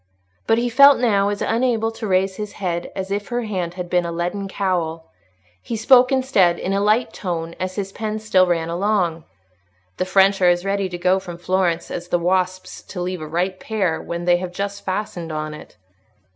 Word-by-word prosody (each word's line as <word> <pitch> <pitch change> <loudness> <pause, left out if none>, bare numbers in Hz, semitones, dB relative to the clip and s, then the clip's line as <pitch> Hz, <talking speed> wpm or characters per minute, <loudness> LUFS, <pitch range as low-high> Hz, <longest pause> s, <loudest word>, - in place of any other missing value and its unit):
But 225 - +4
he 240 +1 +1
felt 280 +3 +7
now 205 -5 +2
as 205 0 -2
unable 225 -1 +1
to 225 -1 -6
raise 190 0 +1
his 210 -1 -5
head 175 -3 -3
as 190 0 -4
if 200 0 -2
her 245 0 -2
hand 180 -5 -3
had 180 -1 -5
been 175 0 +1
a 170 - -4
leaden 175 +4 -3
cowl. 175 -5 -2 0.5
He 230 - -4
spoke 250 +3 +5
instead, 255 -10 +3
in 190 - -2
a 200 - +1
light 215 +4 +2
tone, 170 -3 -4
as 185 0 -3
his 195 -1 -4
pen 215 +1 -3
still 205 -4 +3
ran 165 -2 0
along. 175 -2 0 0.7
"The - - 0
French 195 +1 +3
are 180 - +6
as 175 +1 +1
ready 195 -1 0
to 175 - -5
go 185 +2 +2
from 175 -3 -8
Florence 175 -1 0
as 175 0 -5
the 175 - +1
wasps 185 +1 -1
to 185 - -9
leave 180 -1 -3
a 155 - -6
ripe 180 +4 -2
pear 195 -7 -1
when 170 0 -5
they 175 0 +4
have 180 0 -5
just 200 +2 -4
fastened 185 -4 -4
on 155 0 -4
it." 150 - -12
185 Hz, 205 wpm, -21 LUFS, 175-210 Hz, 0.7 s, felt